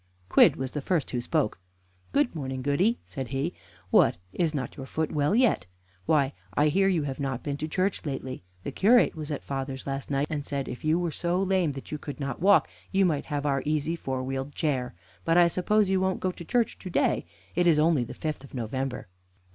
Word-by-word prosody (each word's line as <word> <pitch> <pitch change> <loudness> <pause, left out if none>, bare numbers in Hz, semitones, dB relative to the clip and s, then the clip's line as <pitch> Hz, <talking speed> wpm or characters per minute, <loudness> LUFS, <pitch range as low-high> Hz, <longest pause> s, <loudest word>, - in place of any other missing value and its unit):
Quidd - - +6
was 130 -1 -3
the 145 - -3
first 165 0 0
who 125 - -1
spoke. 140 - 0 0.5
"Good 285 -3 +2
morning, 130 -5 -4
Goody," 180 - +2
said 135 -3 -5
he. 140 +7 -2 0.4
"What, - - +5 0.2
is 170 -3 +1
not 135 -5 -4
your 135 -2 -7
foot 160 +1 -2
well 150 +6 +2
yet? 230 - +3 0.4
Why, 145 -3 +3 0.2
I 150 +1 +4
hear 195 +5 +3
you 175 -5 +2
have 135 -2 -4
not 135 -3 -2
been 145 -1 -2
to 155 - -3
church 185 +5 0
lately. 135 -3 -4 0.2
The - - -4
curate 235 +5 +5
was 155 -1 -6
at 145 - -3
father's 135 -1 -4
last 135 0 -4
night, 140 0 +1
and 150 -2 -3
said 140 -1 -3
if 125 - -7
you 155 +2 +3
were 175 -2 -1
so 175 +3 0
lame 190 -5 +1
that 135 - -9
you 150 - -3
could 145 0 -7
not 140 -1 -4
walk, 200 +2 +5 0.2
you 195 0 +4
might 155 -5 0
have 145 -2 -3
our 135 -2 +1
easy 155 +2 0
four 130 -5 -3
wheeled 135 +2 -4
chair. 130 - -1 0.3
But 165 - +3
I 175 -1 +7
suppose 195 +3 +2
you 190 - +3
won't 190 0 0
go 185 - 0
to 175 - -10
church 240 +4 0
to 185 - -7
day - - +1 0.3
it 175 0 +2
is 165 -3 +5
only 155 -4 +3
the 115 - -8
fifth 155 -3 -4
of 135 - -12
November?" 125 +1 -3
150 Hz, 220 wpm, -27 LUFS, 135-175 Hz, 0.5 s, I